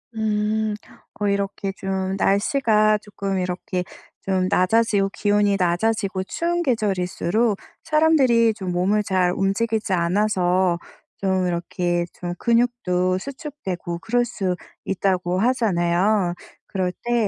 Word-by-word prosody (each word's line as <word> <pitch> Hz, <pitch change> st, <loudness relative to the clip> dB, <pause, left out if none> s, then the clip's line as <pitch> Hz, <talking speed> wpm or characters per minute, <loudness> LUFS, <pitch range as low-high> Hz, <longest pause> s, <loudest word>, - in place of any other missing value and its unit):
음. 215 Hz, 0 st, 0 dB, 0.5 s
어 205 Hz, -, 0 dB
이렇게 200 Hz, 0 st, -1 dB
좀 190 Hz, 0 st, -2 dB
날씨가 215 Hz, +1 st, +3 dB
쪼끔 195 Hz, -2 st, -4 dB
이렇게 180 Hz, 0 st, -2 dB, 0.4 s
좀 185 Hz, -1 st, +1 dB
낮아지고 200 Hz, +1 st, +2 dB
기온이 205 Hz, -1 st, +2 dB
낮아지고 190 Hz, +2 st, 0 dB
추운 345 Hz, -, -1 dB
계절일수록 210 Hz, -, 0 dB, 0.3 s
사람들이 295 Hz, -8 st, +4 dB
좀 190 Hz, -4 st, -5 dB
몸을 190 Hz, +4 st, +1 dB
잘 185 Hz, -3 st, +2 dB
움직이지 215 Hz, +2 st, 0 dB
않아서 180 Hz, -1 st, +2 dB, 0.4 s
좀 190 Hz, -1 st, 0 dB
이렇게 175 Hz, 0 st, -1 dB
좀 175 Hz, -1 st, -5 dB
근육도 230 Hz, -7 st, +1 dB
수축되고 195 Hz, -, -6 dB
그럴 240 Hz, +5 st, +1 dB
수 195 Hz, -6 st, -2 dB, 0.3 s
있다고 185 Hz, -2 st, 0 dB
하잖아요. 195 Hz, -4 st, +2 dB, 0.3 s
그럴 185 Hz, -2 st, -1 dB
때 235 Hz, -2 st, +1 dB
195 Hz, 255 characters per minute, -22 LUFS, 185-220 Hz, 0.5 s, 사람들이